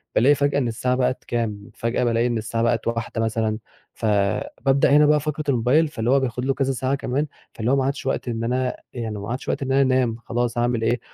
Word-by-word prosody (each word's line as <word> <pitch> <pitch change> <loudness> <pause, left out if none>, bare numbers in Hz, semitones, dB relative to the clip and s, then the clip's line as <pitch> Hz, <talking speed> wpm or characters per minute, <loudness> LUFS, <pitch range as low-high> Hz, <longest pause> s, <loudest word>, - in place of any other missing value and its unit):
بالاقي 140 +6 +5
فجأة 140 0 +1
إن 125 - 0
الساعة 125 +2 0
بقِت 130 0 0
كام، 105 -4 -3
فجأة 115 +2 -1
بالاقي 120 0 +2
إن 120 -1 -1
الساعة 115 +1 -2
بقِت 115 -1 +1
01:00 115 0 -2
مثلًا، 110 -1 0 0.4
فبابدأ 110 +6 +1
هنا 150 - +6
بقى 150 0 +4
فقرة 150 +1 -3
الموبايل، 130 +5 +3
فاللي 115 -6 -3
هو 135 +2 +5
بياخد 125 -1 -2
له 135 - +2
كذا 135 0 0
ساعة 130 +1 -1
كمان، 140 +2 -1 0.3
فاللي 115 +2 -1
هو - - +4
ما 135 -1 +1
عادش 140 +1 -2
وقت 135 - -2
إن 115 -1 -2
أنا 125 +2 0 0.2
يعني 110 -4 -4
ما 100 - -6
عادش 125 +3 -4
وقت 145 - -1
إن 135 - -2
أنا 135 +1 +4
أنام 130 -3 +2
خلاص، 120 0 -1
هاعمل 120 -1 +1
إيه، 120 +2 +1
125 Hz, 225 wpm, -23 LUFS, 115-135 Hz, 0.4 s, هنا